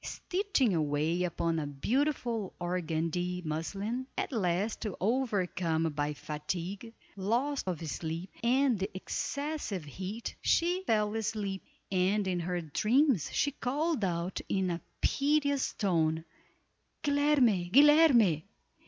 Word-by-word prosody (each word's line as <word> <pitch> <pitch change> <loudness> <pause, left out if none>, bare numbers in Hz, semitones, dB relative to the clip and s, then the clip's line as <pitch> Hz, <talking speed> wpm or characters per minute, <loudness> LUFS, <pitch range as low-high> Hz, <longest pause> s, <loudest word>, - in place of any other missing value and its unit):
Stitching 360 - 0
away 155 +2 +1
upon 165 -1 -1
a 150 - -3
beautiful 230 - -1
organdie 175 0 -2
muslin, 200 +11 -3
at - - -2
last 200 -1 0 0.2
overcome 185 - 0
by 145 0 -1
fatigue, 175 +9 -5 0.2
loss 240 +9 0
of 170 -3 -3
sleep, 165 +4 -4
and 250 -1 +3
the 195 +2 -1
excessive 280 - -3
heat, 190 - -5
she 355 +3 +2
fell 210 -1 +2
asleep, 210 -3 -2 0.3
and 190 +2 +2
in 180 -1 0
her 175 +1 -2
dreams 220 - +2
she 285 - +1
called 290 0 -1
out 175 0 -1
in 190 -2 +1
a 170 - -3 0.2
piteous 285 -1 +2
tone, 160 -4 +1 0.8
"Guilerme! 285 - +3
Guilerme!" 275 - +6
195 Hz, 110 wpm, -31 LUFS, 170-260 Hz, 0.8 s, Guilerme